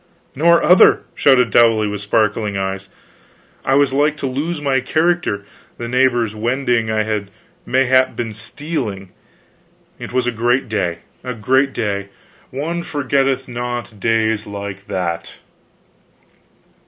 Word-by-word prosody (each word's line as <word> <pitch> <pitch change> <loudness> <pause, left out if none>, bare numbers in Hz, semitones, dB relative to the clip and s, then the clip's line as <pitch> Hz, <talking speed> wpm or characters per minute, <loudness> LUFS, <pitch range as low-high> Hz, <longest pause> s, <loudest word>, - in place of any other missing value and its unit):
"Nor 170 +4 +4
other!" 180 +1 +6
shouted 125 -5 +4
Dowley, 115 -1 +4
with 105 -1 -4
sparkling 105 0 0
eyes. 95 0 -4 0.7
"I 135 - +2
was 140 -1 +3
like 150 +2 +2
to 140 - -4
lose 145 +6 -2
my 140 -2 +1
character, 160 -6 0 0.3
the 120 - -5
neighbors 120 -3 +2
wending 120 0 0
I 110 0 +1
had 105 -2 -3 0.4
mayhap 130 0 +3
been 115 -2 -3
stealing. 110 - -5 0.9
It - - -7
was 125 0 0
a 125 - +1
great 120 +3 +1
day, 90 -6 -2 0.2
a 125 -1 -4
great 130 +5 +2
day; 100 -5 -3 0.4
one 160 +6 -3
forgetteth 135 -3 0
not 120 -3 -5
days 110 0 +1
like 100 -1 -7
that." 85 -3 -3
120 Hz, 130 wpm, -18 LUFS, 105-135 Hz, 0.9 s, other